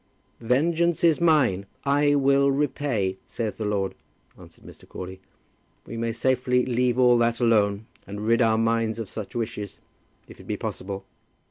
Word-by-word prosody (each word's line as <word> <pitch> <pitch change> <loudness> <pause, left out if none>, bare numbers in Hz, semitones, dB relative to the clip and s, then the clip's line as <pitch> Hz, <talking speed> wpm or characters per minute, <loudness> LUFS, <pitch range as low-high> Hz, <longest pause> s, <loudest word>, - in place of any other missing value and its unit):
"'Vengeance 160 +9 +1
is 165 -1 +4
mine. 125 - +3 0.2
I 145 +1 +3
will 140 0 +3
repay,' 135 -9 -1
saith 110 -3 -4
the 110 - -3
Lord," 100 -2 -1 0.4
answered - - -17
Mr. - - -15
Crawley. 95 +1 -8 0.6
"We - - -8
may 115 0 -2
safely 125 +1 +1
leave 125 0 +1
all 125 -1 +5
that 115 0 +1
alone, 105 -3 +2 0.2
and 105 +2 -6
rid 115 +2 +3
our 110 -1 +3
minds 115 0 0
of 115 -3 -6
such 110 0 -7
wishes, 110 -3 -4 0.5
if - - -14
it - - -14
be - - -2
possible. 95 0 -5
115 Hz, 155 wpm, -25 LUFS, 105-135 Hz, 0.6 s, all